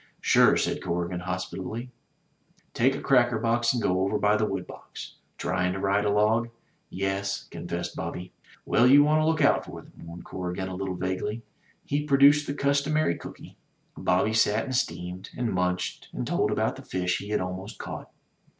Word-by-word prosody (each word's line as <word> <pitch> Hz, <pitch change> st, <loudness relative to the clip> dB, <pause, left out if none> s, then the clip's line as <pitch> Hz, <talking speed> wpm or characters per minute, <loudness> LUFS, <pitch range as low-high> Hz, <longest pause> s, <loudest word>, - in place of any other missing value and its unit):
"Sure," -, -, +5 dB
said -, -, -1 dB
Corrigan, 85 Hz, +1 st, -2 dB
hospitably. 95 Hz, +6 st, -5 dB, 0.8 s
"Take 130 Hz, +3 st, +2 dB
a -, -, -5 dB
cracker 120 Hz, -3 st, +3 dB
box 115 Hz, +1 st, +2 dB
and 120 Hz, -3 st, -2 dB
go 90 Hz, 0 st, +1 dB
over 100 Hz, +2 st, +1 dB
by 105 Hz, 0 st, +3 dB
the 105 Hz, 0 st, +1 dB
wood 95 Hz, -3 st, -3 dB
box. -, -, -10 dB, 0.2 s
Tryin' 90 Hz, 0 st, 0 dB
to 95 Hz, -, -4 dB
ride 100 Hz, +1 st, +1 dB
a -, -, +2 dB
log?" 110 Hz, +3 st, +2 dB, 0.4 s
"Yes," 95 Hz, +1 st, -2 dB
confessed 85 Hz, +1 st, -5 dB
Bobby. 90 Hz, +2 st, -6 dB, 0.3 s
"Well, 120 Hz, -, +4 dB
you 140 Hz, +3 st, +8 dB
want 155 Hz, +1 st, +3 dB
to 155 Hz, -, +2 dB
look 160 Hz, -2 st, +2 dB
out 140 Hz, -, +4 dB
for -, -, -9 dB
them!" -, -, -19 dB
warned 85 Hz, +1 st, -10 dB
Corrigan 90 Hz, +1 st, -4 dB
a 95 Hz, -, -5 dB
little 95 Hz, -1 st, -3 dB
vaguely. 95 Hz, +5 st, -3 dB, 0.4 s
He 145 Hz, +1 st, -1 dB
produced 145 Hz, +1 st, +5 dB
the 140 Hz, -, -3 dB
customary 140 Hz, -, +1 dB
cooky. -, -, -11 dB, 0.4 s
Bobby 95 Hz, +4 st, +1 dB
sat 110 Hz, 0 st, +3 dB
and 130 Hz, -2 st, -3 dB
steamed, 90 Hz, -4 st, -3 dB
and 120 Hz, -4 st, -1 dB
munched 90 Hz, 0 st, -2 dB
and -, -, -3 dB
told -, -, +1 dB
about -, -, 0 dB
the -, -, -9 dB
fish 90 Hz, -1 st, -1 dB
he 100 Hz, -, -8 dB
had 105 Hz, -, +1 dB
al 90 Hz, 0 st, -3 dB
most 95 Hz, +4 st, -8 dB
caught. -, -, -7 dB
100 Hz, 185 wpm, -27 LUFS, 90-120 Hz, 0.8 s, you